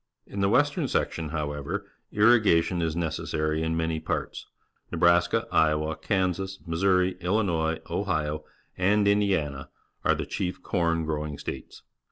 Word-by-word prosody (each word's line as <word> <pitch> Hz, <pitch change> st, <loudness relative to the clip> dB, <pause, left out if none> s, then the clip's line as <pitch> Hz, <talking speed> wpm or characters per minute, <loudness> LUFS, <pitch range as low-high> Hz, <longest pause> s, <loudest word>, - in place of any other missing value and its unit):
In 100 Hz, -, -5 dB
the 100 Hz, -, +3 dB
western 145 Hz, -, +2 dB
section, 80 Hz, -9 st, -1 dB
however, 75 Hz, -2 st, -3 dB, 0.3 s
irrigation 105 Hz, -6 st, +4 dB
is 80 Hz, -1 st, -1 dB
necessary 80 Hz, -2 st, -1 dB
in 80 Hz, 0 st, -1 dB
many 80 Hz, -1 st, -1 dB
parts. -, -, -4 dB, 0.4 s
Nebraska, 85 Hz, 0 st, +3 dB
Iowa, 75 Hz, 0 st, +2 dB
Kansas, 95 Hz, +3 st, -1 dB
Mis 85 Hz, +2 st, -3 dB
souri, 90 Hz, -1 st, +3 dB
Illinois, 85 Hz, -4 st, +1 dB
Ohio, 75 Hz, 0 st, -1 dB, 0.3 s
and 100 Hz, +3 st, +2 dB
Indiana 95 Hz, -10 st, +1 dB, 0.3 s
are -, -, +3 dB
the -, -, -3 dB
chief 90 Hz, -, -4 dB
corn 85 Hz, -2 st, 0 dB
growing 75 Hz, -1 st, -3 dB
states. -, -, -7 dB
85 Hz, 130 wpm, -27 LUFS, 80-95 Hz, 0.4 s, irrigation